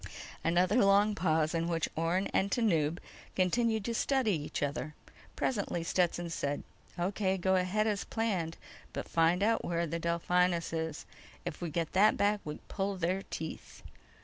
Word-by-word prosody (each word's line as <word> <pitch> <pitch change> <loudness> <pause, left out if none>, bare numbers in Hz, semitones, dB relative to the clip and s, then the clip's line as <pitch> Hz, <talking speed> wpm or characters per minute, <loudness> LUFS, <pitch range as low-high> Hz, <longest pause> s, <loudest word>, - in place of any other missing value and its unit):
_ - - -21 0.4
Another 180 +6 +3
long 200 +2 +5
pause 160 -5 +1
in 165 0 0
which 165 -2 0
Orne 170 +4 +1
and 195 - +2
Tanub 170 -9 +2 0.4
continued 220 +3 +1
to 235 - -1
study 260 -1 +2
each 150 -4 -2
other. 145 +1 -3 0.4
Presently, 200 -8 -1
Stetson 175 -1 0
said: 145 -3 -2 0.3
"O.K. 190 +2 0
Go 190 +1 +1
ahead 185 +4 +1
as 210 -2 0
planned. 190 -8 -2 0.4
But - - -4
find 170 +3 +3
out 225 +1 +2
where 170 0 0
the 165 +1 -3
Delphinus 170 +1 +1
_is! 160 -2 -3 0.4
If 150 - -5
we 175 - -2
get 165 +1 -2
that 205 +3 +5
back 205 +1 +2
we 150 0 -5
pull 195 0 -2
their 180 +2 0
teeth." 160 0 -7
180 Hz, 160 wpm, -32 LUFS, 165-200 Hz, 0.4 s, long